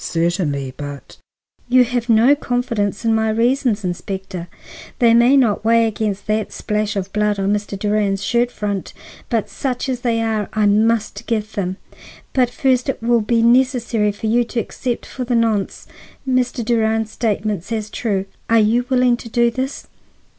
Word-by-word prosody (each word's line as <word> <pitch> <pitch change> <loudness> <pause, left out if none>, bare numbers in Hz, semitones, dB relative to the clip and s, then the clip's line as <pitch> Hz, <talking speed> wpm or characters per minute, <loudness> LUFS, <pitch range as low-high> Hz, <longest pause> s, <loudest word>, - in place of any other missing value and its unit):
"Certainly, 165 -6 -1
but—" 145 -1 -8 0.5
"You 250 0 +6
have 245 0 -2
no 230 +5 +6
confidence 230 -6 -2
in 225 - +3
my 220 0 +1
reasons, 230 -1 +1
Inspector; 185 0 -5 0.5
they 235 -2 +4
may 240 +4 +5
not 225 -6 +2
weigh 230 +1 +4
against 210 -2 -2
that 215 0 -1
splash 210 0 -2
of 195 -1 -4
blood 210 -1 +1
on 195 +1 +1
Mr. 205 -1 -3
Durand's 205 -1 0
shirt 240 +2 +1
front, 205 -5 -4 0.4
but 225 -3 0
such 250 +6 -3
as 255 -2 -2
they 235 -2 0
are 220 -2 -1
I 215 -1 +2
must 215 +2 +1
give 215 -2 -1
them. 190 -3 -3 0.6
But 250 -2 +3
first, 260 -1 +1
it 270 - -2
will 235 0 +3
be 230 +2 +1
necessary 235 -3 +2
for 205 +2 -8
you 235 +3 +3
to 235 - -3
accept 240 +1 -4
for 255 - -6
the 245 0 -1
nonce 225 -4 0 0.4
Mr. 250 -2 0
Durand's 225 -1 +1
statements 210 -4 -2
as 215 -2 -3
true. 200 -5 -1 0.2
Are 230 - +5
you 230 +3 +2
willing 250 -2 +3
to 235 - -10
do 235 +1 +2
this?" 260 +3 -4
225 Hz, 170 wpm, -19 LUFS, 205-240 Hz, 0.6 s, You